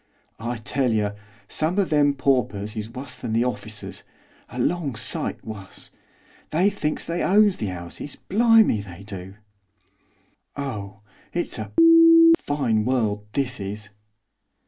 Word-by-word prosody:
'I 120 +1 -3
tell 130 -1 0
yer 105 -2 0 0.3
some 160 +5 -2
of 195 -4 +1
them 145 -2 +3
paupers 125 -7 0
is 110 0 -5
wuss 125 +2 -7
than 110 - -3
the 115 +1 +3
orficers, 110 -4 -5 0.5
a - - -10
long 165 -8 -1
sight 115 +2 -4
wuss! 105 -3 -9 0.6
They 185 +6 +2
thinks 155 -7 -3
they 170 +1 -2
owns 205 0 +4
the 105 - -3
'ouses, 90 +10 -7
blimey 220 - +3
they 100 -1 -11
do. 95 -1 -9 1.2
Oh 105 -8 -6 0.3
it's 175 - -2
a - - -6 0.7
fine 125 -7 0
world, 105 -4 -1
this 125 -4 -1
is! 105 +2 -5
120 Hz, 130 wpm, -23 LUFS, 105-150 Hz, 1.2 s, owns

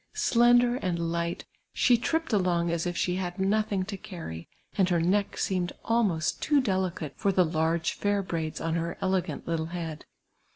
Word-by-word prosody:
Slender 240 +1 +4
and 180 -7 -1
light, 170 0 -2 0.3
she 245 - +4
tripped 320 +5 -1
along 175 -4 +2
as 170 +1 -1
if 175 -1 -3
she 180 0 0
had 180 -1 -3
nothing 200 0 +1
to 200 0 -5
cany, 160 - -8 0.3
and 190 -2 +3
her 175 -2 +2
neck 195 +5 +1
seemed 185 -2 -1
almost 210 -9 +1
too 295 -1 +3
delicate 185 - -1
for 200 - +1
the 185 -1 +4
large 160 0 0
fair 205 -1 0
braids 160 -4 -3
on 165 0 -2
her 170 0 -2
elegant 185 -5 -1
little 165 -1 -1
head. 165 -3 -6
180 Hz, 170 wpm, -28 LUFS, 170-205 Hz, 0.3 s, Slender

